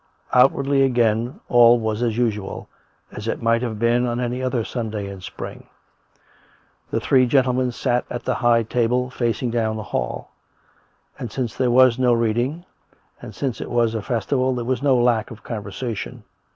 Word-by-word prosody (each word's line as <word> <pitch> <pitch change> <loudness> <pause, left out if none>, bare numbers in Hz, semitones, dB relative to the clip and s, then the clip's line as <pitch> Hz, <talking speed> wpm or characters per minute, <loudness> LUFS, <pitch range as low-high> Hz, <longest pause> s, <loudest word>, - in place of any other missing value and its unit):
Outwardly, 135 +2 +4
again, 120 -2 +1
all 120 0 +6
was 110 -1 -2
as 115 -2 0
usual 105 -5 -2 0.2
— - - -39
as 105 - -6
it - - -2
might 115 0 +2
have 115 -4 -3
been 120 +2 +2
on 120 0 -2
any 125 +1 -2
other 125 -2 -1
Sunday 110 -4 -4
in 100 -1 -8
spring. - - -8 1.2
The - - -1
three 130 -1 +3
gentlemen 130 -1 +2
sat 125 0 -1
at 120 - -5
the - - 0
high 120 -1 +3
table, 125 +2 0
facing 120 0 -1
down 110 -2 0
the 110 - -5
hall; - - -4 0.9
and, 120 - -5
since 120 -2 -3
there 130 -2 +1
was 130 0 +5
no 125 -1 +4
reading, 120 +9 0 0.6
and - - -10
since 130 -6 -3
it - - -6
was 120 -2 +1
a 110 - -2
festival, 130 +4 0
there 120 -1 -3
was 130 0 -1
no 135 -3 +3
lack 120 -3 +2
of 115 -2 -12
conversation. 110 0 -5
120 Hz, 175 wpm, -22 LUFS, 115-125 Hz, 1.2 s, all